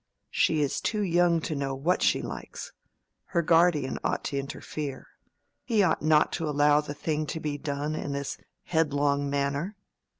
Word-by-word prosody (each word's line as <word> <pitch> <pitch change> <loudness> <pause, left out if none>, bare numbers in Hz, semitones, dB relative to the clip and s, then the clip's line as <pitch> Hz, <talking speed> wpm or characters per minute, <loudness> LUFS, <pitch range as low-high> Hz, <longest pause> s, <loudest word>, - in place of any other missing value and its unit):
"She 155 -2 +2
is 140 - -1
too 210 -2 0
young 175 -2 +3
to 155 - -3
know 135 -1 -2
what 160 +7 +1
she - - +2
likes. - - -7 0.5
Her 170 -2 0
guardian 165 -4 +3
ought - - -1
to 140 - -2
interfere. 140 0 -5 0.6
He 220 -5 +2
ought 170 -4 +2
not 155 -1 +4
to 165 -3 -2
allow 145 0 +4
the 145 -1 -7
thing 155 +1 -2
to 160 - -3
be 150 -2 -3
done 145 +1 -2
in 145 -2 -3
this 140 0 -4 0.2
headlong 145 -3 +1
manner. 140 +7 -1
150 Hz, 165 wpm, -28 LUFS, 140-165 Hz, 0.6 s, not